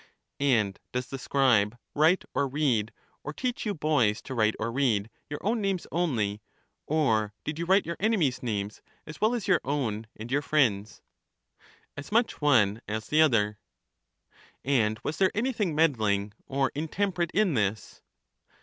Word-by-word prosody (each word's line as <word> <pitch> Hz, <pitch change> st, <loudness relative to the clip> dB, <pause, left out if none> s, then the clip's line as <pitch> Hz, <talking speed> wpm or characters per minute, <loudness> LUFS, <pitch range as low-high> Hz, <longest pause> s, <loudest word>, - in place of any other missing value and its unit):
And 115 Hz, -8 st, +1 dB
does 125 Hz, 0 st, -1 dB
the 135 Hz, -, -5 dB
scribe 120 Hz, -5 st, +2 dB, 0.2 s
write 160 Hz, +5 st, +3 dB
or 140 Hz, -, +1 dB
read, 130 Hz, -6 st, 0 dB, 0.3 s
or 150 Hz, -, -5 dB
teach 245 Hz, +3 st, -3 dB
you 205 Hz, -, -1 dB
boys 145 Hz, -9 st, +2 dB
to 135 Hz, -, -6 dB
write 110 Hz, -3 st, +2 dB
or 115 Hz, +2 st, -2 dB
read, 115 Hz, -5 st, 0 dB, 0.2 s
your 145 Hz, -, -4 dB
own 220 Hz, +2 st, 0 dB
names 195 Hz, -3 st, -1 dB
only, 115 Hz, -12 st, -1 dB, 0.5 s
or 110 Hz, -9 st, +1 dB
did 150 Hz, +1 st, -4 dB
you 170 Hz, -, -2 dB
write 190 Hz, +3 st, +3 dB
your 170 Hz, +1 st, -4 dB
enemies' 190 Hz, -, +1 dB
names 105 Hz, -3 st, -3 dB, 0.2 s
as 155 Hz, 0 st, -10 dB
well 220 Hz, +3 st, +3 dB
as 230 Hz, -, -4 dB
your 185 Hz, -4 st, +3 dB
own 115 Hz, -6 st, -2 dB
and 115 Hz, +3 st, -8 dB
your 145 Hz, +2 st, +2 dB
friends'? 115 Hz, -9 st, 0 dB, 0.9 s
As 145 Hz, +5 st, -9 dB
much 230 Hz, -3 st, +1 dB
one 115 Hz, -7 st, +3 dB
as 110 Hz, +1 st, -4 dB
the 155 Hz, +1 st, +4 dB
other. 105 Hz, -8 st, +2 dB, 1.1 s
And 110 Hz, -6 st, +1 dB
was 155 Hz, -, -3 dB
there 190 Hz, -1 st, +4 dB
anything 215 Hz, -, 0 dB
meddling 105 Hz, -10 st, +1 dB
or 135 Hz, -1 st, 0 dB
intemperate 170 Hz, +3 st, -1 dB
in 205 Hz, -4 st, +3 dB
this? 105 Hz, -3 st, -2 dB
140 Hz, 160 wpm, -28 LUFS, 110-165 Hz, 1.1 s, the